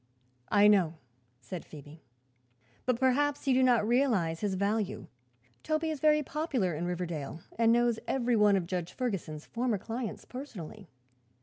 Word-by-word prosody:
"I 205 0 +6
know," 185 -6 +4 0.5
said 160 +8 -7
Phoebe; 150 +1 -13 0.9
"but 250 -2 +1
perhaps 280 +3 +2
you 265 - +4
did 260 0 +4
not 235 -4 +3
realize 220 -10 +2
his 205 -3 -1
value. 200 +1 -1 0.6
Toby 315 +1 -1
is 305 - -4
very 300 +1 +4
popular 265 - -1
in 165 +3 -3
Riverdale 170 -4 -4
and 230 0 +4
knows 240 -1 +3
every 245 -2 +1
one 210 -2 +5
of 185 -3 0
Judge 180 -1 -4
Ferguson's 190 - -3
former 240 -2 -1
clients 225 +3 -5
personally." 215 - -9
215 Hz, 145 wpm, -30 LUFS, 180-255 Hz, 0.9 s, I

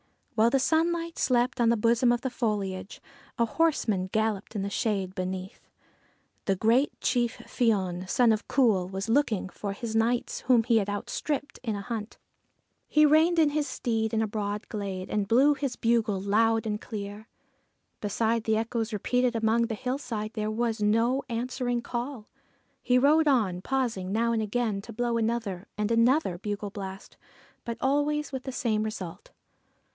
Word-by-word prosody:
While 225 +1 +4
the 270 - +3
sunlight 335 +3 0
slept 245 -1 +2
on 230 - +4
the 235 - +3
bosom 235 +3 +3
of 240 0 +1
the 260 - -2
foliage, 200 -6 -3 0.4
a 235 - +3
horseman 225 - +1
galloped 220 -1 -1
in 200 - -1
the 200 - -2
shade 200 -6 -1
beneath. 185 0 -5 0.8
The 195 - +2
great 230 +8 +2
chief 245 -1 0
Fion, 190 -6 0
son 245 -2 +4
of 215 -1 -1
Cumhail, 210 -9 +2
was 195 +2 -4
looking 225 -7 +1
for 200 0 -5
his 225 +1 -5
knights, 235 +2 +1
whom 245 -3 +3
he 235 0 +3
had 205 -2 0
outstripped 285 +8 -3
in 225 -4 -2
the 200 - -4
hunt. 220 0 -5 0.7
He 305 0 +5
reined 315 +3 +4
in 310 -3 +4
his 295 0 0
steed 225 -3 -1
in 220 -1 +1
a - - -1
broad 205 0 -3
glade, 195 -3 -4
and 205 -2 0
blew 265 +7 +5
his 275 -3 -3
bugle 225 -4 +1
loud 225 +3 +2
and 210 -1 -2
clear. 210 0 -7 0.7
Beside 225 +2 0
the 220 -1 +2
echoes 225 0 -2
repeated 245 +4 0
among 225 +1 +2
the 225 - -3
hillsides, 230 -3 -4
there 215 -1 -2
was 225 0 -1
no 230 +6 +2
answering 245 0 -2
call. 240 -1 -4 0.6
He 250 - +3
rode 300 +4 +4
on, 210 -10 +2
pausing 230 -7 -1
now 230 +3 +1
and 225 -1 +1
again 215 -1 -1
to 230 +3 -10
blow 240 +1 0
another 225 -5 -2
and 210 +1 -1
another 230 - +3
bugle 205 0 -4
blast, 195 -1 -8 0.5
but 235 -1 -4
always 290 +2 0
with 265 -2 -5
the 265 - -3
same 220 -4 0
result. 210 -6 -6
225 Hz, 170 wpm, -28 LUFS, 210-250 Hz, 0.8 s, He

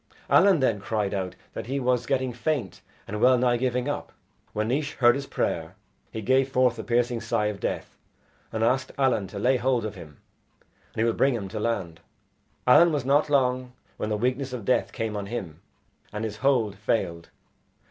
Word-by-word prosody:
Allen 190 -7 +6
then 115 -6 +2
cried 105 0 -2
out 95 -2 -3 0.2
that - - -6
he 135 +2 -1
was 125 -1 0
getting 130 -2 0
faint 125 - -2 0.3
and 105 +1 -4
well 130 0 +6
nigh 125 0 +2
giving 125 +1 -1
up. 145 - -3 0.4
When 110 +1 -2
Naois 145 +3 -1
heard 120 -2 +5
his 140 +1 -4
prayer, - - -2 0.4
he 110 - -5
gave 130 +3 +3
forth 125 -2 +3
the 110 - -5
piercing 120 0 0
sigh 105 - 0
of 105 -1 -2
death, - - -4 0.5
and 110 0 -1
asked 130 +3 +1
Allen 130 -8 +2
to 100 - -9
lay 125 +6 +2
hold 125 -1 +1
of 110 - -4
him 80 -7 -12 0.8
and - - -29
he 110 - +1
would 115 -1 +1
bring 135 -2 +3
him 100 -4 -4
to 110 - -5
land. 95 -7 -2 0.7
Allen 170 +7 +7
was 145 -4 -1
not 145 +3 +3
long 130 -2 +1 0.2
when 105 - -3
the 105 - 0
weakness 130 +3 -1
of 120 -5 -5
death 125 - +1
came 110 -1 -3
on 100 -1 -4
him, 95 -9 -6 0.5
and 105 +1 -4
his 110 -1 -4
hold 120 -6 +2
failed. 95 -5 -2
120 Hz, 195 wpm, -26 LUFS, 105-130 Hz, 0.8 s, Allen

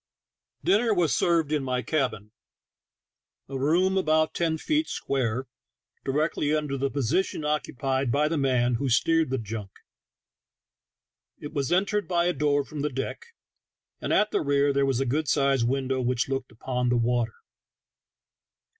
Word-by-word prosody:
Dinner 220 +1 +3
was 170 -5 +2
served 165 -4 +2
in 150 -3 +1
my 125 -1 -1
cabin 125 -9 -2 0.6
— - - -64
a 135 - -7
room 175 +8 +2
about 155 -2 +2
ten 165 -2 0
feet 310 - 0
square, 130 -2 -2 0.6
directly 150 +1 0
under 150 -2 -2
the 135 +1 -1
position 140 +7 0
occu 150 -3 -2
pied 135 -1 0
by 150 +4 +2
the 165 - -1
man 125 -3 +2
who 140 - 0
steered 160 +5 +3
the 130 - 0
junk; 110 -3 -5 1.7
it 145 - -8
was 140 -4 -1
entered 200 +3 +1
by 175 -1 +1
a 180 - +2
door 145 0 +1
from 150 0 -6
the 150 - 0
deck, 135 - -5 0.7
and - - -3
at 210 0 +3
the - - +1
rear 140 0 +2
there 140 0 +2
was 130 -2 +1
a 135 - 0
good 145 +5 -1
sized 135 -4 +2
window 130 0 0
which 125 -1 0
looked 135 -1 -3
upon 125 +2 -2
the 125 - +2
water. 120 -1 0
140 Hz, 160 wpm, -26 LUFS, 130-155 Hz, 1.7 s, Dinner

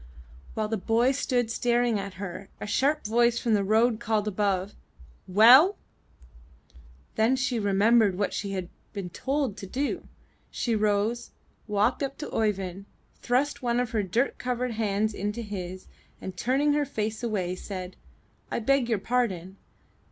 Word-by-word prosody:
*' 65 +2 -20
While 215 -1 -1
the 220 +1 -1
boy 230 +6 +2
stood 245 -4 0
staring 240 -2 +1
at 195 -2 -6
her, 195 +1 -7
a - - -5
sharp 280 +7 +1
voice 235 +2 +3
from 235 -1 0
the 205 -2 +3
road 220 +3 +2
above 210 -2 0
called, 200 -1 0 0.6
''WellT' 255 - +8 1.4
Then 225 +4 +3
she 250 -2 -1
remembered 205 0 +3
what 200 - -1
she 200 -2 -3
had 185 -2 -4 0.2
been 195 -4 -5
told 270 - -2
to 195 - -7
do; 275 +8 -3 0.4
she 235 -2 -1
rose, 215 +2 0 0.4
walked 210 +5 +1
up 275 0 -3
to 300 - -6
Oeyvind, 195 -3 -1 0.4
thrust 270 +5 0
one 240 -1 +1
of 245 -1 -1
her 220 -3 +1
dirt 225 +8 -1
covered 250 0 -2
hands 215 -1 0
into 210 +4 -3
his, 185 -3 -6 0.3
and 190 - -7
turning 270 +9 +1
her 295 0 +2
face 220 -4 -3
away 200 -7 -1
said, 185 -1 -7 0.6
*1 225 - -3
beg 275 -2 +3
your 225 - +2
pardon! 195 -5 -1
220 Hz, 155 wpm, -27 LUFS, 200-245 Hz, 1.4 s, WellT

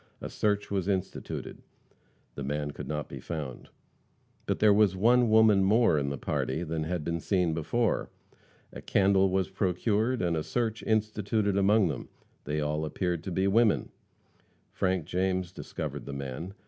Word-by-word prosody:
A - - -7
search 105 -1 0
was 95 -2 -1
instituted. 95 -2 -3 0.7
The 70 - -6
man 75 +1 -2
could - - -8
not 75 -1 -3
be - - -8
found. 75 -7 -6 0.8
But - - 0
there 105 -1 +5
was 100 -2 +4
one 120 +4 +4
woman 110 -3 +5
more 105 -5 +4
in 70 -1 -1
the 70 - -3
party 65 +5 -2
than 80 -1 -3
had 85 -1 -2
been 85 +2 -2
seen 90 -2 +1
before. 100 +9 0 0.6
A - - -8
candle 95 -1 +3
was 95 0 0
procured 105 +5 0
and 85 -1 +1
a 80 - -1
search 115 +5 -2
instituted 110 -1 0
among 100 0 +4
them. 70 - -5 0.4
They 75 +1 -2
all 75 +1 -1
appeared 85 +2 -2
to 95 - -4
be 95 +2 0
women. 110 +2 +3 0.8
Frank 95 -4 0
James 95 0 -1
discovered - - -6
the 70 - -5
man. 70 +8 -6
95 Hz, 160 wpm, -29 LUFS, 80-105 Hz, 0.8 s, there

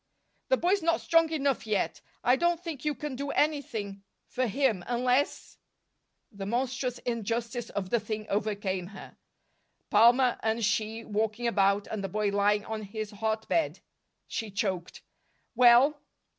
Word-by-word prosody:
"The - - +4
boy's 380 +1 +2
not 335 0 +2
strong 330 -1 +3
enough 280 -6 0
yet. 210 -2 -1 0.2
I 250 - +5
don't 345 +4 +1
think 330 -7 -7
you 300 -1 0
can 290 +1 -5
do 280 +2 -4
anything 230 -11 -1 0.2
for 255 0 -1
him, 225 -5 +1
unless 250 +3 0 0.3
" - - -51
The 195 - -4
monstrous 250 +2 -1
injustice 235 +1 -3
of 190 -2 -4
the 235 - +3
thing 215 0 -5
overcame 200 -3 -2
her. 195 0 -11 0.8
Palmer 240 +4 +5
and 220 0 0
she 220 +2 -1
walking 220 +2 -1
about, 200 -3 +2
and 215 -2 -5
the 195 - -3
boy 210 +2 0
lying 205 +1 +2
on 220 -1 -4
his 215 +1 -6
hot 220 +1 -2
bed! 330 - 0 0.5
She 225 - -4
choked. 190 -4 -3 0.5
"Well?" 250 +4 +6
230 Hz, 150 wpm, -29 LUFS, 205-260 Hz, 0.8 s, Well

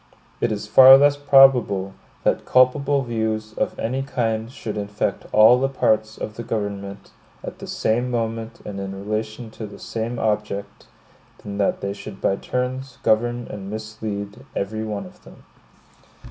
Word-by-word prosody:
It 115 - 0
is 105 -1 -3
far 130 +5 +9
less 145 +1 +4
probable, 130 -9 +4 0.3
that - - +1
culpable 140 +2 +3
views 110 -2 -2
of - - -2
any 130 +4 -2
kind 115 -4 -2
should 110 -4 -6
infect 105 -1 -3
all 110 +4 +7
the 135 - +1
parts 110 -4 0
of 110 - -6
the 120 - -5
government 100 -3 -5 0.3
at - - -8
the - - -8
same 120 +3 0
moment 115 -1 -3
and 100 -1 -6
in 95 0 -5
relation 110 +3 -4
to 110 -1 -7
the 100 - -12
same 115 +1 -4
object, 105 -2 -3 0.6
than 100 0 -6
that 100 - +1
they 100 0 -2
should 100 0 -10
by 95 - +1
turns 125 +2 -4
govern 120 +2 +1
and 100 -1 -7
mislead 110 0 -6
every 110 +2 -3
one 105 -2 -4
of 90 - -16
them. - - -16
110 Hz, 160 wpm, -22 LUFS, 105-120 Hz, 0.6 s, far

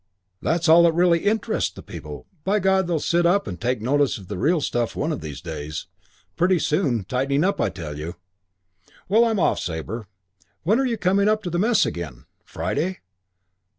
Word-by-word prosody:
"That's 165 +1 0
all 165 +2 +8
that 170 -1 +4
really 175 0 +3
interests 215 +2 +1
the - - -12
people. - - -9 0.2
By 200 +2 +2
God, 190 -2 +2
they'll 170 -3 0
sit 170 +3 +2
up 200 +3 +2
and 90 -1 -7
take 120 -1 -1
notice 140 +2 +2
of 95 -3 -13
the 105 - -4
real 160 - +2
stuff 120 -5 -1
one 155 +3 -1
of 150 - -3
these 75 -3 -7
days. 75 -2 -6 0.5
Pretty 180 +2 +3
soon. 150 - 0
Tightening 135 - 0
up, 200 +2 +1
I - - +2
tell 80 -5 -7
you. 85 +4 -5 0.9
Well, 225 +5 +5
I'm 225 -2 +1
off, - - +2
Sabre. 95 +6 -5 0.6
When 210 +9 +3
are 270 - +2
you 235 -2 -1
coming 195 +2 +2
up 215 0 +1
to 175 - -4
the 175 - 0
Mess 225 +2 +3
again? 70 -9 -6 0.2
Friday? 185 +4 -3
160 Hz, 190 wpm, -23 LUFS, -, 0.9 s, all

